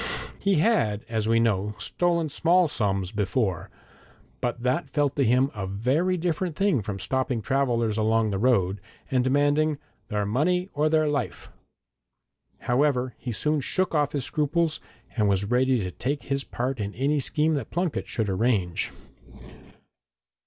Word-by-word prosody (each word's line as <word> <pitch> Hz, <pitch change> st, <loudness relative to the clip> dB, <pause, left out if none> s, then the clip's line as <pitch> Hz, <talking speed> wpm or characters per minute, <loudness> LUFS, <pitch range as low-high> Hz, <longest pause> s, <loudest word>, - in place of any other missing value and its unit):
He 200 Hz, -1 st, +2 dB
had, 150 Hz, -, +2 dB
as 110 Hz, -2 st, -1 dB
we 115 Hz, 0 st, +3 dB
know, 105 Hz, -2 st, +1 dB
stolen 170 Hz, -2 st, 0 dB
small 175 Hz, +4 st, +3 dB
sums 100 Hz, -, -1 dB
before, 100 Hz, -3 st, -1 dB, 0.7 s
but 120 Hz, 0 st, -3 dB
that 130 Hz, +7 st, 0 dB
felt 145 Hz, -2 st, 0 dB
to 140 Hz, -, +2 dB
him 130 Hz, +3 st, +3 dB
a 95 Hz, -3 st, -4 dB
very 135 Hz, -, 0 dB
different 170 Hz, 0 st, -1 dB
thing 195 Hz, -, +2 dB
from 100 Hz, -1 st, -4 dB
stopping 130 Hz, +3 st, -1 dB
travellers 120 Hz, -4 st, 0 dB
along 110 Hz, 0 st, +2 dB
the 95 Hz, -, -2 dB
road, 100 Hz, -5 st, +2 dB, 0.3 s
and 130 Hz, -1 st, +2 dB
demanding 145 Hz, +3 st, +2 dB, 0.3 s
'their 105 Hz, -2 st, -1 dB
money 180 Hz, -, 0 dB
or 150 Hz, +1 st, +1 dB
their 155 Hz, -1 st, +3 dB
life.' 140 Hz, -5 st, -3 dB, 1.1 s
However, 125 Hz, -1 st, +1 dB
he 125 Hz, -, -4 dB
soon 150 Hz, +6 st, 0 dB
shook 185 Hz, +7 st, -1 dB
off 145 Hz, -2 st, +1 dB
his 140 Hz, -4 st, -1 dB
scruples, 155 Hz, +3 st, 0 dB, 0.4 s
and 105 Hz, -4 st, +2 dB
was 100 Hz, 0 st, +1 dB
ready 125 Hz, +2 st, +2 dB
to 90 Hz, -, -4 dB
take 140 Hz, +9 st, -3 dB
his 140 Hz, 0 st, -1 dB
part 130 Hz, 0 st, -3 dB
in 105 Hz, 0 st, -4 dB
any 145 Hz, +4 st, +1 dB
scheme 150 Hz, +3 st, +1 dB
that 140 Hz, -7 st, -3 dB
Plunket 175 Hz, -1 st, -2 dB
should 110 Hz, -4 st, -2 dB
arrange. 95 Hz, -3 st, 0 dB
130 Hz, 150 wpm, -26 LUFS, 110-150 Hz, 1.1 s, we